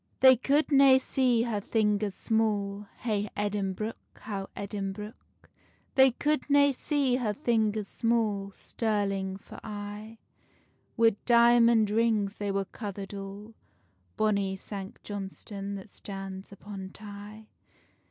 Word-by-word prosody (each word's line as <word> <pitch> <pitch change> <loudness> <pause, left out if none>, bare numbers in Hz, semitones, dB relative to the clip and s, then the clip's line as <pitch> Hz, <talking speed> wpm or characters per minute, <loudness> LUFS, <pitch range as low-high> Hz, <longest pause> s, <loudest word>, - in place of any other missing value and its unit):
They 260 -1 +9
could 285 +6 +1
nae 275 -1 +7
see 255 -3 +2
her 220 -4 -2
fingers 210 -2 +1
small, 210 -3 0
Hey 210 -3 -1
Edinbruch, 205 +1 -2 0.2
how 200 -2 -6
Edinbruch. 200 +1 -4 0.8
They 265 -1 +7
could 295 +3 -1
nae 285 0 +5
see 270 -1 +1
her 220 -5 -1
fingers 220 -6 +1
small, 215 -4 0
Stirling 195 -4 -1
for - - -12
aye: 210 +1 -7 0.8
Wi' 225 -2 +4
diamond 235 -2 +5
rings 215 -2 +1
they 205 -1 -2
were 195 0 0
cover'd 200 -1 -7
all, 200 +2 -8 0.6
Bonny 200 -3 +1
Sanct 195 0 -8
Johnstonne 200 0 -6
that 195 +1 -9
stands 195 -1 -7
upon 195 -1 -8
Tay. 205 +2 -10
210 Hz, 115 wpm, -29 LUFS, 200-230 Hz, 0.8 s, They